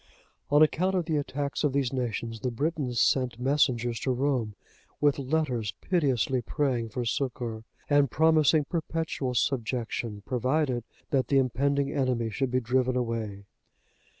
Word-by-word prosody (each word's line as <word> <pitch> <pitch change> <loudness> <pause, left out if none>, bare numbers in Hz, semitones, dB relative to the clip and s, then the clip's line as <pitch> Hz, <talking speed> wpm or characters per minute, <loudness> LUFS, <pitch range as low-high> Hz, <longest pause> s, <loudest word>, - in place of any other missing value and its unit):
On 145 +2 +6
account 185 +5 +1
of 180 -3 0
the 155 -2 0
attacks 140 0 -2
of 145 -3 +2
these 135 -2 0
nations, 115 -2 -3
the 125 - -1
Britons 135 -1 -1
sent 125 -3 +2
messengers 125 -3 +1
to - - -2
Rome 125 -5 0 0.4
with 145 -1 +3
letters 130 -7 -1
piteously 135 - +1
praying 125 -3 -1
for 125 +1 -3
succour, 120 -3 -3 0.2
and 145 -2 +4
promising 155 +1 +4
perpetual 160 -5 -2
subjection, 115 -4 -1
provided 130 -1 0 0.3
that 130 -4 +2
the 140 - +3
impending 140 +2 +1
enemy 125 -4 0
should 135 +4 -1
be 125 +1 +1
driven 130 +1 +1
away. 115 -5 -3
130 Hz, 140 wpm, -28 LUFS, 120-145 Hz, 0.4 s, On